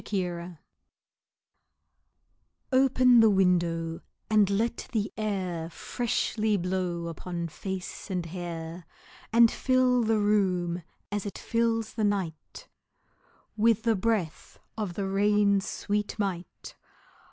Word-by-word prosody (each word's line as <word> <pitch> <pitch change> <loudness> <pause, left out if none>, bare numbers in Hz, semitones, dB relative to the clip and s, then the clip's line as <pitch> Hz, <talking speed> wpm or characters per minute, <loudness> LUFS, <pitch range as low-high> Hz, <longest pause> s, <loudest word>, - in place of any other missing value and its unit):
Nelson] 175 -3 -3 2.2
OPEN 255 -2 +5
the 225 -1 +7
window, 170 -4 +1 0.3
and 210 -2 +5
let 225 +4 -1
the 215 -2 -1
air 185 -6 -2
Freshly 220 +1 -1
blow 180 -2 -2
upon 170 +1 -4
face 190 +4 -6
and 180 -3 -2
hair, 170 0 -6 0.4
And 230 0 +6
fill 255 -1 +2
the 225 -1 +2
room, 185 -4 +1 0.3
as 205 0 -2
it 200 - -6
fills 230 -1 0
the 220 - -2
night, 190 -7 -3 0.9
With 225 0 +3
the 230 -1 +3
breath 195 -5 -2 0.2
of 205 -6 -4
the 200 - -2
rain's 200 0 +2
sweet 210 0 -2
might. 185 -4 -4
200 Hz, 105 wpm, -28 LUFS, 175-220 Hz, 2.2 s, the